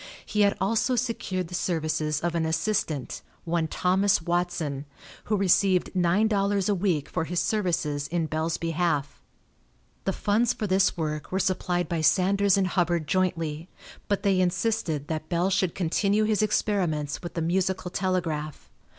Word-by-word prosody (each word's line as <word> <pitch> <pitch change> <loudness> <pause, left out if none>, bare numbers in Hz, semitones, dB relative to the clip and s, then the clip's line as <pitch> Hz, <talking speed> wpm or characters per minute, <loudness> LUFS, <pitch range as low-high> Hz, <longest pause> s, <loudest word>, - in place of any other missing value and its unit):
He 210 - 0
had 200 -1 +3
also 225 +6 +1
secured 220 -7 -2
the 180 - -11
services 155 -4 -1
of 170 0 -1
an 165 -1 0
assistant, 160 - -1 0.2
one 165 -1 0
Thomas 190 +4 +2
Watson, 165 -5 -2 0.4
who 210 - +1
received 190 -1 +3
nine 185 +4 +3
dollars 200 -2 +1
a 205 - +3
week 175 -6 0
for 160 -2 -2
his 175 +1 -1
services 165 -9 -1
in 170 -1 -1
Bell's 160 +1 -1
behalf. 165 -4 -1 0.8
The 195 - +1
funds 220 +5 +1
for 215 - -4
this 190 -1 +2
work 155 -2 -3
were 190 - 0
supplied 180 -2 0
by 165 -1 -1
Sanders 195 +4 +3
and 195 - +2
Hubbard 175 -3 0
jointly, 165 -2 -1 0.4
but 200 0 0
they 195 -2 +3
insisted 180 -5 0
that 155 -1 -4
Bell 175 +2 +1
should 185 -2 +1
continue 200 +4 +1
his 215 -2 +1
experiments 180 -9 0
with 175 - -7
the 165 - -1
musical 185 +1 0
telegraph. 160 - -2
180 Hz, 155 wpm, -26 LUFS, 160-195 Hz, 0.8 s, had